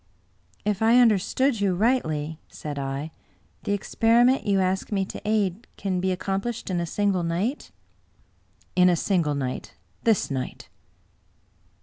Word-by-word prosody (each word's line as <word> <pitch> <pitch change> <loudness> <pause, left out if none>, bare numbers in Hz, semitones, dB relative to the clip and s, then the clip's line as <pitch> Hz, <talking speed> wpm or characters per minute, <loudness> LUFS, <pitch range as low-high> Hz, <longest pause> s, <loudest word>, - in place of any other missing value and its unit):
" - - -36
If 210 -1 0
I 225 +2 +5
understood 235 +2 +3
you 195 -3 +2
rightly," 160 - 0
said 145 -2 -6
I, 135 +3 -4 0.3
" - - -38
the 205 - +1
experiment 230 +5 +3
you 200 -1 +3
ask 190 +2 0
me 195 -2 +1
to - - -8
aid 210 0 0
can 190 -2 -1
be 190 +1 0
accomplished 195 +4 -3
in 175 - 0
a 170 - -2
single 200 0 +1
night? 180 - -2 0.4
'* - - -38
" - - -36
In 180 0 +6
a 175 - +4
single 165 -4 +1
night 130 -2 -4
— - - -38
^this 220 -9 +2
night." 130 -2 -5
190 Hz, 160 wpm, -25 LUFS, 170-220 Hz, 0.4 s, In